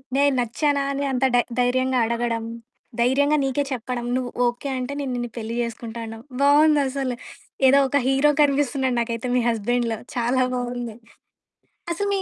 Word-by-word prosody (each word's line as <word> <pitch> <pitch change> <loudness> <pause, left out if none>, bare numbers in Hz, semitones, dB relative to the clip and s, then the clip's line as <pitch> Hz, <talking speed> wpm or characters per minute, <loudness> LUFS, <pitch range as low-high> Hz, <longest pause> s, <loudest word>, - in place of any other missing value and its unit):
నేను 285 0 +4
నచ్చానా 280 +5 0
అని 280 +1 -2
అంత 265 0 +1
డ - - +6 0.2
ధైర్యంగా 255 +1 +2
అడగడం, 230 0 -1 0.6
ధైర్యంగా 285 +5 +3
నీకే 270 +1 0
చెప్పడం, 245 0 -3
నువ్వు 250 -1 -3 0.2
ఓకే 240 +3 -3
అంటే 255 +2 -4
నేను 275 -2 -3
నిన్ను 240 -1 -3
పెళ్లి 230 +1 -4
చేసుకుంటాను 230 0 -5
అనడం. 225 0 -8 0.2
బాగుందసలు 280 -3 +3 0.5
ఏదో 275 - +6
ఒక 285 +2 +1
హీరో 270 +2 +4
కనిపిస్తున్నాడు 275 -3 +1
నాకైతే 230 +1 -3
మీ 250 - +3
హస్బాండ్‌లో 230 0 0 0.2
చాలా 250 +2 +2
బాగుంది. 245 -2 -4 1.0
అసలు 405 +4 -2
మీ 390 - 0
250 Hz, 145 wpm, -23 LUFS, 240-280 Hz, 1.0 s, డ